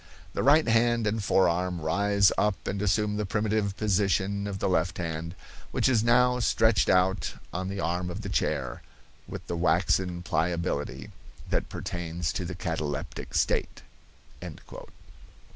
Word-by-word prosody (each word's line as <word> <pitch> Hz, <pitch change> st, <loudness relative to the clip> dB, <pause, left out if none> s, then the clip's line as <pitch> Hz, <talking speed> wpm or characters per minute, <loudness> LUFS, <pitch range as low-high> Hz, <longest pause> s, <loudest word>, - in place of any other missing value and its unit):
The -, -, -1 dB
right 150 Hz, +2 st, +5 dB
hand 115 Hz, 0 st, +3 dB
and 105 Hz, 0 st, -1 dB
forearm 90 Hz, -2 st, +2 dB
rise 100 Hz, +5 st, +3 dB
up 105 Hz, -2 st, 0 dB
and 100 Hz, 0 st, -2 dB
assume 105 Hz, +1 st, +1 dB
the 105 Hz, -, -1 dB
primitive 105 Hz, -1 st, 0 dB
position 100 Hz, -1 st, +1 dB
of 100 Hz, -1 st, -4 dB
the -, -, -1 dB
left 90 Hz, -2 st, 0 dB
hand, 80 Hz, 0 st, -4 dB, 0.3 s
which -, -, +1 dB
is 120 Hz, -4 st, +3 dB
now 125 Hz, +1 st, +4 dB
stretched 110 Hz, -1 st, +3 dB
out 95 Hz, +2 st, +2 dB, 0.2 s
on 95 Hz, +2 st, -3 dB
the 100 Hz, 0 st, -4 dB
arm 90 Hz, 0 st, -1 dB
of 90 Hz, +5 st, -5 dB
the 105 Hz, -, -6 dB
chair, -, -, -1 dB, 0.5 s
with -, -, -7 dB
the 85 Hz, -, -3 dB
waxen 90 Hz, +1 st, +1 dB
pliability 80 Hz, -6 st, -2 dB, 0.4 s
that -, -, 0 dB
pertains 85 Hz, -1 st, -4 dB
to 90 Hz, -, -3 dB
the 90 Hz, +1 st, -5 dB
cataleptic 80 Hz, -6 st, -4 dB
state." -, -, 0 dB
95 Hz, 145 wpm, -27 LUFS, 85-105 Hz, 0.5 s, right